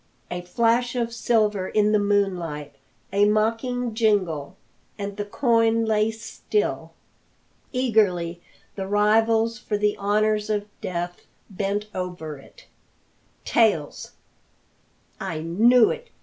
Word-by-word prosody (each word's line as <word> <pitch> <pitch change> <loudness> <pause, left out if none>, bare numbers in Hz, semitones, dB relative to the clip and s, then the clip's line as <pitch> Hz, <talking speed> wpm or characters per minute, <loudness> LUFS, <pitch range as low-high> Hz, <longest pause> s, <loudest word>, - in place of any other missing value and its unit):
A 175 0 -3
flash 235 +6 +1
of 235 -1 -1
silver 215 -5 +1
in 210 0 +2
the 215 - +4
moonlight, 180 -8 -1 0.4
a 200 +1 +4
mocking 225 +3 0
jingle, 190 -8 0 0.4
and 200 -1 -5
the 205 - -4
coin 230 0 +2
lay 215 0 +2
still. 225 - -3 0.8
Eagerly 200 -9 +1 0.3
the 195 -1 -5
rivals 225 +3 +2
for 210 - -2
the 210 0 +1
honours 210 +1 +1
of 205 -1 0 0.2
death 175 0 -5 0.2
bent 200 +2 -2
over 175 -5 -5
it. - - -18 0.8
"Tails!" - - +1 1.1
"I 165 -5 -4
knew 225 +9 +4
it!" 480 0 -7
210 Hz, 110 wpm, -24 LUFS, 185-225 Hz, 1.1 s, the